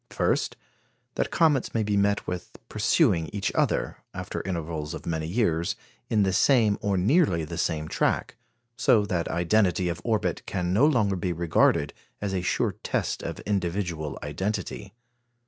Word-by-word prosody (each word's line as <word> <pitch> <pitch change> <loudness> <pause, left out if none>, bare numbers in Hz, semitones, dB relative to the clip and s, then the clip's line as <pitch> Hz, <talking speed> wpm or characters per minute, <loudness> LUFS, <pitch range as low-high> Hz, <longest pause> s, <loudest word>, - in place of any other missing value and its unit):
First, - - 0 0.6
that - - -1
comets 150 -9 +2
may 110 - +2
be 105 0 0
met 100 0 +2
with 90 -1 -6
pursuing 80 -1 +2
each 100 -1 -2
other, - - 0 0.2
after - - -4
intervals 80 -4 -4
of - - -9
many 80 -1 -2
years, 85 -4 0 0.3
in 105 -2 +3
the 95 -1 +1
same, 110 -1 +4
or 100 -2 0
nearly 95 - +3
the - - -6
same, 80 -1 -1
track; - - 0 0.4
so 105 -2 +3
that 90 -5 -1
identity 90 +1 +2
of 85 - -4
orbit 110 -3 0
can 90 0 -1
no 125 +10 +5
longer 110 -10 +2
be 90 0 -2
regarded 80 -3 +2 0.3
as 100 -2 -3
a 95 - 0
sure - - 0
test - - -2
of - - -5
individual 85 -6 -2
identity. 95 +6 -4
95 Hz, 155 wpm, -26 LUFS, 85-105 Hz, 0.6 s, no